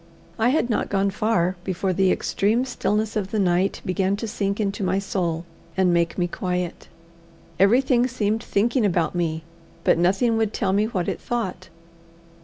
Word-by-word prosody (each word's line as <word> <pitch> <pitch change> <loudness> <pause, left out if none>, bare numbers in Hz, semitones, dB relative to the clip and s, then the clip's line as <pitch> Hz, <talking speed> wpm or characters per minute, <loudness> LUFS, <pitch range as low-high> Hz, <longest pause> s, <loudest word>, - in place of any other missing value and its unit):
I 225 +2 +4
had 270 -2 +2
not 230 - -1
gone 195 0 +1
far 190 -3 0
before 185 0 -1
the 190 0 +3
extreme 225 +6 +1
stillness 220 -4 -1
of 200 -3 -1
the 215 - -2
night 185 -1 +1
began 190 +1 +1
to 225 +3 -5
sink 200 -1 -2
into 200 -1 -1
my 185 +1 +1
soul 175 -4 -2 0.3
and 185 -2 +3
make 170 -1 +1
me 175 - +1
quiet. 180 -1 -3 0.7
Everything 245 +5 +4
seemed 220 -3 -1
thinking 235 +3 +1
about 175 -5 +1
me, 165 -2 -1 0.4
but - - +3
nothing 200 +7 +2
would 220 -1 0
tell 195 -4 0
me 205 +2 +3
what 190 -6 -2
it - - -3
thought. 190 -7 -3
195 Hz, 170 wpm, -23 LUFS, 180-220 Hz, 0.7 s, I